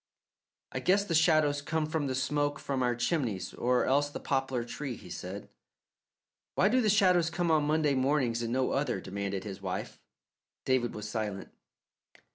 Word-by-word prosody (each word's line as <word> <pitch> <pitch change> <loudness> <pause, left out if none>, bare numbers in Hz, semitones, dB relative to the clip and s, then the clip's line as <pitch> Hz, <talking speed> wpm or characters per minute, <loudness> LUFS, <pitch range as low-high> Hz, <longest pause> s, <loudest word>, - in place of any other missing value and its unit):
"I - - -3
guess 195 +2 +3
the 170 - -2
shadows 155 -3 +4
come 155 +2 -1
from 155 -2 -1
the 130 - -1
smoke 145 +2 0
from 135 -3 -2
our 120 -1 +1
chimneys, 120 - -1
or 125 0 +1
else 145 +2 +2
the - - -6
poplar 135 -3 -1
tree," 120 +2 -5
he 90 - -12
said. 95 +3 -6 1.1
"Why 195 - +4
do 255 +3 +3
the 215 - +2
shadows 180 -5 +4
come 175 -1 0
on 155 -2 +3
Monday 155 -1 +2
mornings, 130 -3 +1
and 115 -1 -2
no 130 +1 +1
other?" 140 -7 0
demanded 100 0 -4
his 100 -3 -7
wife. - - -4 0.7
David 130 -3 +1
was 105 -1 -5
silent. 105 -3 -4
135 Hz, 170 wpm, -30 LUFS, 120-155 Hz, 1.1 s, shadows